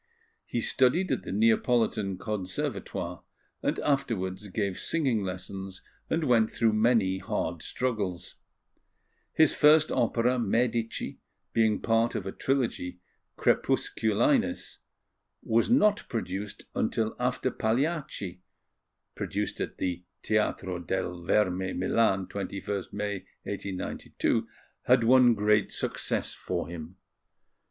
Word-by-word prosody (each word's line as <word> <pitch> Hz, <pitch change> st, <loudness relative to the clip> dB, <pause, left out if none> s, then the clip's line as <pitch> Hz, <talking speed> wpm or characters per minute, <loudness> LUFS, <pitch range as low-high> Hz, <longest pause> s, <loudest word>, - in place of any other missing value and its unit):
He 120 Hz, -, -1 dB
studied 135 Hz, +11 st, +3 dB
at -, -, 0 dB
the -, -, -7 dB
Neapolitan 110 Hz, -2 st, +2 dB
Conservatoire, 95 Hz, -2 st, -3 dB, 0.4 s
and -, -, 0 dB
afterwards 105 Hz, -9 st, -1 dB
gave 100 Hz, -1 st, -2 dB
singing 135 Hz, -10 st, +1 dB
lessons 95 Hz, +1 st, -6 dB, 0.3 s
and 165 Hz, 0 st, +1 dB
went 115 Hz, -5 st, +4 dB
through 115 Hz, -2 st, +2 dB
many 110 Hz, -4 st, +3 dB
hard 85 Hz, -3 st, -3 dB
struggles. 105 Hz, -8 st, -2 dB, 0.9 s
His 160 Hz, -2 st, +4 dB
first 150 Hz, +1 st, +5 dB
opera, 120 Hz, +2 st, +2 dB
Medici, 115 Hz, +1 st, -1 dB, 0.3 s
being 110 Hz, -2 st, +3 dB
part 115 Hz, 0 st, +2 dB
of 95 Hz, -, -3 dB
a 95 Hz, -, -3 dB
trilogy, 115 Hz, -11 st, -1 dB, 0.4 s
Crepusculinis, 110 Hz, -2 st, +1 dB, 0.6 s
was 115 Hz, -, +2 dB
not 210 Hz, -4 st, +3 dB
produced 100 Hz, -2 st, -4 dB
until 110 Hz, 0 st, 0 dB
after 125 Hz, +1 st, 0 dB
Pagliacci 120 Hz, -, -1 dB, 0.7 s
(produced -, -, -3 dB
at -, -, -4 dB
the 90 Hz, -1 st, -2 dB, 0.2 s
Teatro 95 Hz, -4 st, 0 dB
dal 90 Hz, +1 st, -2 dB
Verme, 95 Hz, 0 st, +1 dB
Milan, 95 Hz, 0 st, +2 dB
21st 100 Hz, 0 st, -4 dB
May, 105 Hz, 0 st, -2 dB, 0.3 s
1892) 95 Hz, -2 st, -2 dB, 0.4 s
had 125 Hz, -1 st, +5 dB
won 125 Hz, 0 st, +6 dB
great 105 Hz, 0 st, +2 dB
success -, -, -1 dB
for 90 Hz, -2 st, -3 dB
him. 85 Hz, +1 st, -8 dB
110 Hz, 105 wpm, -28 LUFS, 95-120 Hz, 0.9 s, won